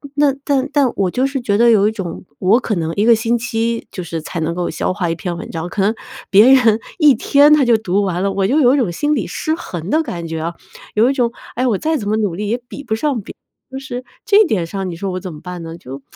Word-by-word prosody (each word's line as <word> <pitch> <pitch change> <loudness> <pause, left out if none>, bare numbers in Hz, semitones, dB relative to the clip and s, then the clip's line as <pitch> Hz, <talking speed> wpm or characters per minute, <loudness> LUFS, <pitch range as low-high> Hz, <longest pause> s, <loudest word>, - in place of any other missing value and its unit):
那 290 -1 +3
但 275 -2 +1
但 280 -4 +3
我 190 -3 0
就 255 - 0
是 275 0 -3
觉 205 -4 0
得 235 +2 +5
有 210 -2 +5
一 - - +1
种， 195 -5 -6
我 200 +6 +4
可 225 -4 -2
能 165 -1 -2
1 205 +2 +1
个 235 - +6
星 230 +2 0
期 230 0 -2
就 185 - -6
是 165 -1 -5
才 165 +2 -6
能 160 +1 -1
够 175 -1 -2
消 160 - -2
化 180 -4 -2
1 165 - -1
篇 175 0 -4
文 - - -8
章， 165 +1 -4
可 195 - -2
能 210 +4 +2 0.3
别 205 +4 +6
人 230 -5 +5 0.2
1 300 -4 +6
天 290 +1 +5
他 300 -2 +5
就 235 -2 +4
读 200 -2 0
完 180 -2 -1
了。 200 - +1
我 195 0 0
就 280 +8 +2
有 255 -2 +5
一 - - +3
种 235 -10 0
心 295 - 0
理 220 - -2
失 315 - -2
衡 175 - -7
的 310 +7 +2
感 170 - -5
觉 160 0 -4
啊。 170 +1 -4 0.4
有 225 +4 +4
一 - - +1
种 245 -4 0 0.2
“哎， 250 - 0
我 215 - +1
再 315 +9 0
怎 205 -6 -4
么 215 - +1
努 205 -5 -1
力 205 +3 -4
也 235 - 0
比 285 - -9
不 220 -5 -2
上 265 0 -1
别”。 - - -11 0.3
就 265 - -7
是 255 -2 -6 0.2
这 430 0 +5
点 200 - 0
上 190 +2 -4
你 170 - -6
说 190 +2 -4
我 185 - -3
怎 185 -2 -7
么 150 - -11
办 180 -1 -7
呢？ 165 0 -8
就 135 -2 -9
215 Hz, 290 characters per minute, -18 LUFS, 180-255 Hz, 0.4 s, 个